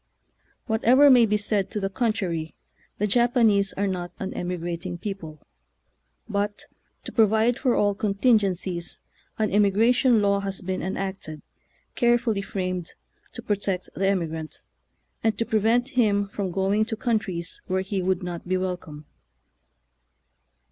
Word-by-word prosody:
Whatever 250 +5 +5
may 240 -3 +6
be 210 0 +2
said 205 -2 0
to 210 - -3
the 195 - -1
contrary, 195 - -2 0.4
the 210 - 0
Japanese 225 -3 +3
are 200 - -1
not 180 -2 -3
an 195 - -5
emigrating 175 0 -4
people; 165 -6 -7 0.8
but, 205 -1 -2 0.4
to - - -7
pro 225 -2 +5
vide 220 +4 +2
for 255 -3 +2
all 205 0 +2
contingencies, 195 -4 0 0.4
an 215 -1 0
emigration 225 +5 +4
law 200 -1 +2
has 195 -1 -4
been 185 0 -3
enacted, 190 -5 -5 0.5
carefully 240 -4 +2
framed, 185 -4 -4 0.4
to - - -8
protect 200 -3 -2
the 195 - 0
emigrant, 160 -5 -2 0.6
and 220 -2 +1
to 230 - 0
prevent 225 +3 +2
him 210 -7 +2
from 200 -1 -3
going 195 +4 +1
to 220 - -3
countries 210 -8 -2
where 190 +1 0
he 190 0 -2
would 185 0 0
not 175 -1 -6
be 185 +1 +1
welcome. 175 -5 -5
200 Hz, 135 wpm, -25 LUFS, 185-220 Hz, 0.8 s, may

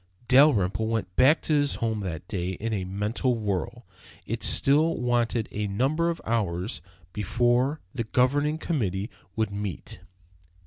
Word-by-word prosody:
Dalrymple 110 -7 +4
went 110 -5 -3
back 140 +6 +4
to 155 - 0
his 145 -1 +2
home 110 -2 -2
that 90 -4 -5
day 95 -2 -3
in 110 +5 -4
a 95 -3 -2
mental 105 +6 -1
whirl. 100 -5 -3 0.4
It - - -4
still 155 +4 +4
wanted 120 -2 0
a 105 0 -2
number 135 +12 0
of 170 - -3
hours 105 -2 -2 0.3
before 120 - +1
the 115 -3 -3
Governing 145 +6 +1
Committee 105 - -2 0.2
would 110 -2 -1
meet. 100 -5 -5
115 Hz, 140 wpm, -26 LUFS, 100-135 Hz, 0.4 s, Dalrymple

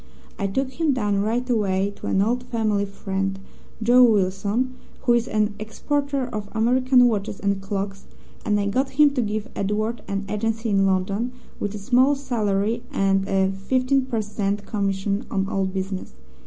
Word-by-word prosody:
I 200 - 0
took 260 +7 -1
him 310 +1 +1
down 205 -5 0
right 235 +4 -1
away 200 -4 +1
to - - -7
an 190 - +2
old 240 +4 0
family 215 -4 0
friend, 195 -1 -3 0.5
Joe 245 +3 +6
Willson, 210 +3 +2 0.3
who 240 - +4
is 235 0 +2
an 215 -1 +1
exporter 280 +5 -1
of 215 -4 -5
American 250 +3 +4
watches 205 -3 -2
and 200 -1 0
clocks, 195 0 -4 0.4
and 210 -1 +1
I 200 - 0
got 260 +7 -1
him 295 -1 +7
to 270 -3 0
give 215 +1 -3
Edward 215 +3 -1
an 195 0 -2
agency 225 +2 -1
in 195 -1 +3
London, 195 +6 0 0.3
with 205 0 -3
a - - -3
small 255 +7 +3
salary 225 -4 0
and 195 0 +1
a 190 -1 +2
15 255 +7 +1
per 230 -4 -1
cent 205 -1 -2
commission 200 +1 -1
on 195 -2 0
all 195 -1 0
business. 190 - -4
210 Hz, 170 wpm, -23 LUFS, 195-245 Hz, 0.5 s, him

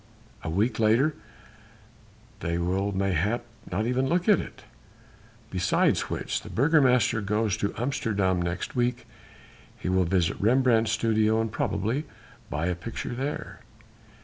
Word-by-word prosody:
A 80 - -4
week 105 +7 0
later 115 +8 +3 1.3
they 85 -1 -2
will 95 +4 0
mayhap 100 +4 0 0.3
not 100 +5 0
even 125 +2 +1
look 175 +2 +1
at 210 -5 +6
it. - - -8 0.9
Besides - - +1
which - - -2
the - - -10
Burgomaster 130 -5 +3
goes 105 0 0
to 100 -2 -1
Amsterdam 100 -7 0
next 85 +1 -3
week. 125 0 0 0.7
He - - -4
will 95 0 +2
visit 85 -1 0
Rembrandt's 115 0 +3
studio, 110 -1 +2
and 110 -1 -1
probably 110 +8 -1 0.4
buy 75 +2 -2
a 90 - +1
picture 100 +8 -5
there...." 135 +4 -4
110 Hz, 130 wpm, -27 LUFS, 95-125 Hz, 1.3 s, at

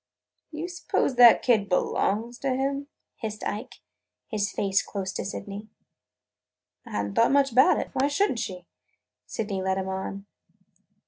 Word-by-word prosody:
"D' 310 - -8
you 330 +3 -3
suppose 355 -6 -1
that 245 -2 +7
kid 215 -5 +3
belongs 220 +5 0
to 275 - -1
him?" 275 +2 -1 0.3
hissed 215 -2 -5
Ike, 215 +5 -5 0.4
his 205 -3 -2
face 195 -1 +1
close 195 -1 -5
to - - -3
Sydney's. 205 +2 -6 1.2
"I - - -10
had 100 - 0
n't - - -9
thought 230 - +4
much 275 -1 +3
about 255 +3 +5
it. - - -4
Why 270 - +2
should 395 +9 +2
n't 240 - -3
she?" 180 -4 -5 0.6
Sydney 200 -3 -3
led 190 0 0
him 190 0 -2
on. 190 +1 -5
215 Hz, 165 wpm, -26 LUFS, 195-265 Hz, 1.2 s, that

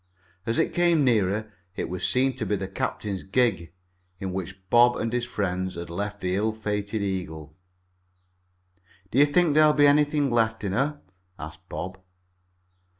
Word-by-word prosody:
As 115 - 0
it - - +1
came 170 -3 +3
nearer 105 -3 +1 0.2
it - - -3
was 90 0 -5
seen 130 0 +2
to - - -2
be 105 - +1
the 95 -1 -4
captain's 95 0 -3
gig, 95 -6 0 0.5
in 95 -1 -4
which 95 0 -6
Bob 120 +1 +6
and 115 +1 -2
his 120 -1 0
friends 95 -4 -2
had 85 0 -7
left 105 +3 -4
the 90 0 -1
ill 110 +2 0
fated 105 -1 -3
Eagle. 80 -6 -4 1.6
"Do 130 - +2
you 145 - +7
think 160 +1 +3
there'll 155 0 +6
be 145 -1 +5
anything 145 -1 +3
left 110 -2 +1
in 100 - -1
her?" 140 +7 -1 0.4
asked 80 +4 -9
Bob. 95 +1 -6
105 Hz, 160 wpm, -26 LUFS, 95-125 Hz, 1.6 s, you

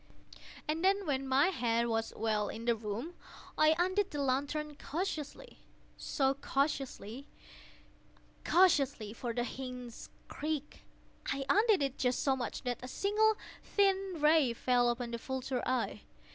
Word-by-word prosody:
And 315 +3 -1
then, 390 +1 +3
when 270 -3 -1
my 275 +6 +4
head 235 -9 +1
was 225 -1 -1
well 215 -2 0
in 225 +1 -6
the 235 -1 +3
room, 225 +9 -5 0.4
I 310 +1 +5
undid 375 +3 +1
the 295 - -5
lantern 285 +3 -1
cautiously—oh, 330 - -4 0.4
so 270 -2 0
cautiously—cautiously 215 - -2
(for 235 +1 -4
the 240 +1 -1
hinges 250 -1 -7 0.2
creaked)—I 290 -2 -5
undid 420 -5 +4
it 275 -1 -3
just 250 -1 +1
so 270 -2 +3
much 250 -2 -4
that 245 -2 -2
a 255 - -6
single 425 +8 +2 0.2
thin 390 -3 +1
ray 300 -4 +4
fell 245 0 +2
upon 240 0 -2
the 235 - -3
vulture 260 0 -3
eye. 255 0 -1
270 Hz, 130 wpm, -33 LUFS, 235-315 Hz, 0.4 s, I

